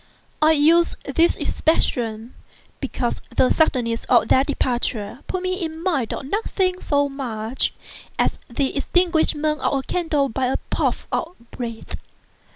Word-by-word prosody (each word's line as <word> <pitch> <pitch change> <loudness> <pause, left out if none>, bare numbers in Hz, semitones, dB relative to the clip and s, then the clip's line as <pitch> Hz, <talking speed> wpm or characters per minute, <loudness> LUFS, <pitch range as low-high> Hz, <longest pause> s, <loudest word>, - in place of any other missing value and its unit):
I 310 +1 +6
use 325 +3 +4
this 335 +1 +3
expression, 230 -7 -1 0.5
because - - -2 0.2
the 255 - +5
suddenness 240 -7 +1
of 240 -3 +4
their 260 - +5
departure 240 -5 -1
put 370 -1 -3
me 370 0 -1
in 320 -1 -4
mind 295 - 0
of - - -4
nothing 370 +1 -1
so 285 -1 +2
much 245 -4 -2 0.5
as - - +1
the 265 +3 -1
extinguishment 310 -1 +2
of 280 - +1
a 270 - -3
candle 305 -3 0
by 260 +1 -1
a 260 - +1
puff - - 0
of 340 +2 -2
the 235 - -18
breath. 230 -2 -6
280 Hz, 145 wpm, -22 LUFS, 245-325 Hz, 0.5 s, I